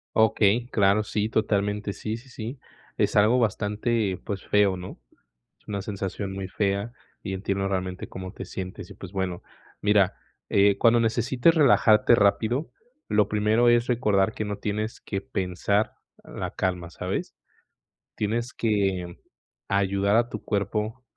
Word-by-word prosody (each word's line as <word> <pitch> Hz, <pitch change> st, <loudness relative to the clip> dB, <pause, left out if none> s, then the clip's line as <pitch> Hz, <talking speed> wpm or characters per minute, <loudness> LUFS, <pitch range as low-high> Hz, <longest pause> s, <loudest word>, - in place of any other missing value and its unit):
Okey, 110 Hz, +1 st, +3 dB
claro, 100 Hz, +1 st, +3 dB
sí, 105 Hz, +1 st, -1 dB
totalmente, 105 Hz, -1 st, 0 dB
sí, 110 Hz, +2 st, -4 dB
sí, 125 Hz, +3 st, -16 dB
sí, 125 Hz, +1 st, -7 dB, 0.4 s
es -, -, +1 dB
algo 105 Hz, +4 st, +5 dB
bastante, 105 Hz, -2 st, 0 dB
pues, 100 Hz, -2 st, -5 dB
feo, 100 Hz, -2 st, +3 dB
¿no?, 90 Hz, -6 st, -9 dB, 0.6 s
es -, -, -34 dB
una 100 Hz, -2 st, -3 dB
sensación 100 Hz, 0 st, -4 dB
muy 95 Hz, 0 st, -4 dB
fea 100 Hz, +3 st, -1 dB, 0.3 s
y 95 Hz, -, -3 dB
entiendo 95 Hz, 0 st, -2 dB
realmente 95 Hz, -1 st, -3 dB
cómo 95 Hz, 0 st, -7 dB
te -, -, -7 dB
sientes, 95 Hz, 0 st, -7 dB
y -, -, -10 dB
pues 95 Hz, -2 st, -10 dB
bueno, 95 Hz, -2 st, -3 dB, 0.4 s
mira, 100 Hz, -2 st, +3 dB, 0.6 s
cuando 120 Hz, 0 st, +5 dB
necesites 120 Hz, +7 st, +2 dB
relajarte 120 Hz, -6 st, +5 dB
rápido, 115 Hz, +7 st, +2 dB, 0.4 s
lo 105 Hz, -1 st, +3 dB
primero 105 Hz, +3 st, +3 dB
es 120 Hz, 0 st, +3 dB
recordar 110 Hz, -5 st, +2 dB
que 110 Hz, -, -4 dB
no 105 Hz, -1 st, -4 dB
tienes 105 Hz, +2 st, -3 dB
que 100 Hz, -, -4 dB
pensar 100 Hz, -1 st, -1 dB, 0.3 s
la -, -, -6 dB
calma, 90 Hz, -3 st, -2 dB
¿sabes?, -, -, -4 dB, 0.8 s
tienes 115 Hz, +4 st, -2 dB
que 95 Hz, -5 st, -1 dB, 0.5 s
ayudar 100 Hz, +1 st, +1 dB
a 120 Hz, +1 st, +3 dB
tu 110 Hz, -, -7 dB
cuerpo 105 Hz, +4 st, -2 dB
105 Hz, 140 wpm, -26 LUFS, 95-110 Hz, 0.8 s, algo